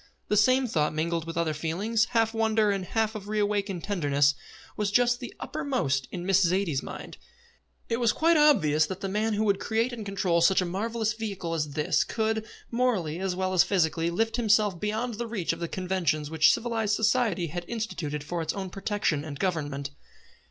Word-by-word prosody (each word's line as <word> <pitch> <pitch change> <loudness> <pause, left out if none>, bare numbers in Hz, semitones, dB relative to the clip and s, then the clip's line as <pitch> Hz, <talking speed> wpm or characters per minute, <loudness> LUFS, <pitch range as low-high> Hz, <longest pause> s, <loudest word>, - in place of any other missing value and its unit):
The 210 - +2
same 255 +5 +4
thought, 155 -10 0
mingled 165 +1 -1
with 165 - -5
other 165 -2 0
feelings, 195 +9 0
half 225 -2 +1
of - - -13
wonder 220 -1 +3
and 195 -2 -2
half 220 +2 0
of 210 -2 -7
re 215 0 -2
awakened 205 -4 -1
tenderness, 145 -7 +2 0.4
was 210 -1 -1
just 245 +3 +3
then 245 -3 -6
uppermost 135 - -1
in 175 -1 -5
Miss 195 0 +4
Zaidie's 175 -5 +1
mind. - - -8 0.7
It 230 - 0
was 235 -3 +3
quite 330 +1 +3
obvious 185 - +4
that 190 +3 -6
the 195 - -2
man 215 +3 0
who 215 +1 0
could 200 -2 +2
create 230 +3 0
and 230 -2 -5
control 190 -4 0
such 190 +3 +5
a 185 - +1
marvellous 220 +4 -1
vehicle 200 -6 -4
as 150 -3 -2
this 150 0 +1
could, 220 -1 -1 0.2
morally 220 -10 0
as 190 -1 -2
well 185 0 -1
as 180 - +6
physically, 170 -3 +1
lift 225 +7 0
himself 210 -5 +2
beyond 220 +3 -2
the 235 - -2
reach 205 -8 -1
of 165 - -8
the 170 - -3
conventions 170 -5 -1
which 160 -1 +5
civilised 225 -3 0
society 220 -5 +1
had 175 +3 -4
instituted 170 -11 -4
for 170 +3 -3
its 160 - -2
own 190 -2 -5
protection 195 -7 -1
and 150 -2 -7
government. 145 -6 -2
195 Hz, 195 wpm, -27 LUFS, 165-220 Hz, 0.7 s, as